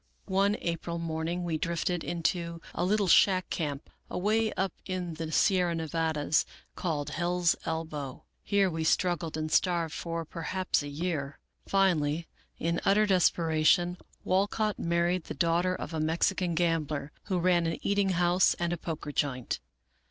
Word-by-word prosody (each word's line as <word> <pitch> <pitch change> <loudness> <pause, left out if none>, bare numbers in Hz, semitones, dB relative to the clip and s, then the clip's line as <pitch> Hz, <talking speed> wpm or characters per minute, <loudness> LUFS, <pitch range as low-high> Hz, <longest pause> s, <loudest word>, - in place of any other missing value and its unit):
One 200 +1 +2
April 170 0 -3
morning 165 +1 -2
we 165 -2 -1
drifted 170 +1 -1
into 170 0 -2
a - - -1
little 200 +2 +2
shack 185 +1 +4
camp, 145 -3 -3 0.2
away 215 +3 +1
up 190 -2 -1
in 180 -3 -3
the 160 0 -5
Sierra 180 -1 +3
Nevadas, 160 -2 0 0.3
called 150 -5 -2
Hell's 175 +1 +1
Elbow, 155 -5 -4 0.2
Here 200 -1 +2
we 165 -3 -2
struggled 165 -1 +1
and 155 0 -3
starved 170 -3 +2
for 165 -1 -4
perhaps 180 +3 -1
a 145 - -6
year. 145 -2 -3 0.3
Finally, 170 -5 +2 0.3
in 170 +1 -1
utter 210 +2 +4
despera 165 -5 +2
tion, 175 +2 +4 0.2
Walcott 205 +3 +1
married 170 +1 +1
the - - -6
daughter 175 +2 +2
of - - -6
a 160 - -2
Mexican 170 +3 +1
gambler, 155 -4 0
who 190 -3 -1
ran 175 -1 +3
an 165 - -2
eating 200 -1 +2
house 175 0 +3
and 175 0 -1
a - - -2
poker 155 -3 -5
joint. 135 -4 -1
170 Hz, 150 wpm, -29 LUFS, 160-185 Hz, 0.3 s, shack